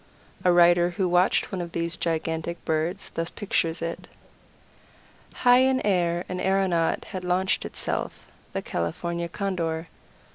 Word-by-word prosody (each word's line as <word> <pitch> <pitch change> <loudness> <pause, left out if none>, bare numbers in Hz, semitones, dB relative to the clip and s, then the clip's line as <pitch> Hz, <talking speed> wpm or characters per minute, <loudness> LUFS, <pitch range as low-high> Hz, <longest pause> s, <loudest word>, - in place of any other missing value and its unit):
A 180 - +5
writer 175 0 +5
who 180 +1 -1
watched 180 +2 +2
one 190 -3 -2
of 170 0 -6
these 170 0 -1
gigantic 165 0 -2
birds 160 +5 -1
thus 165 0 -3
pictures 165 -5 -1
it: 170 0 -5 1.2
"High 245 0 +5
in 260 0 +3
air 175 -3 +1
an 180 0 -4
aeronaut 190 -4 +1
had 185 -1 -5
launched 180 +2 +1
itself - - -4 0.3
the - - -3
California 170 - -3
Condor. 170 -4 -2
175 Hz, 135 wpm, -26 LUFS, 165-185 Hz, 1.2 s, A